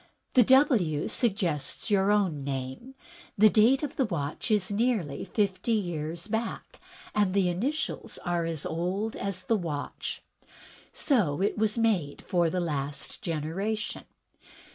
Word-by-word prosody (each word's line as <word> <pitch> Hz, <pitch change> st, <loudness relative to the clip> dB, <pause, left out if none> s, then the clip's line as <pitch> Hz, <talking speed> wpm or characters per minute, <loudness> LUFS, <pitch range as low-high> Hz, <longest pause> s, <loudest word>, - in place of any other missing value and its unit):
The 255 Hz, -, +7 dB
W. 230 Hz, -, +4 dB
suggests 185 Hz, -, -1 dB
your 195 Hz, -1 st, +4 dB
own 185 Hz, -9 st, +1 dB
name. 135 Hz, -, -5 dB, 0.4 s
The 215 Hz, +1 st, +7 dB
date 245 Hz, +6 st, +5 dB
of 295 Hz, 0 st, -4 dB
the 265 Hz, -, +3 dB
watch 160 Hz, -2 st, -3 dB
is 210 Hz, -3 st, +1 dB
nearly 205 Hz, -, 0 dB
fifty 200 Hz, +1 st, 0 dB
years 170 Hz, -5 st, -2 dB
back, 225 Hz, +2 st, -4 dB, 0.3 s
and 200 Hz, -2 st, +2 dB
the 190 Hz, -3 st, +3 dB
initials 260 Hz, -, -2 dB
are 175 Hz, -1 st, 0 dB
as 165 Hz, -3 st, -4 dB
old 185 Hz, +7 st, -2 dB
as 195 Hz, -1 st, -4 dB
the 225 Hz, -, +2 dB
watch: 155 Hz, -6 st, -4 dB, 0.7 s
So 195 Hz, -, +1 dB
it 205 Hz, -, +1 dB
was 215 Hz, +1 st, 0 dB
made 200 Hz, -11 st, +1 dB
for 175 Hz, -3 st, +2 dB
the 180 Hz, -, -1 dB
last 145 Hz, -4 st, -4 dB
generation. 180 Hz, +7 st, -3 dB
190 Hz, 135 wpm, -28 LUFS, 160-220 Hz, 0.7 s, The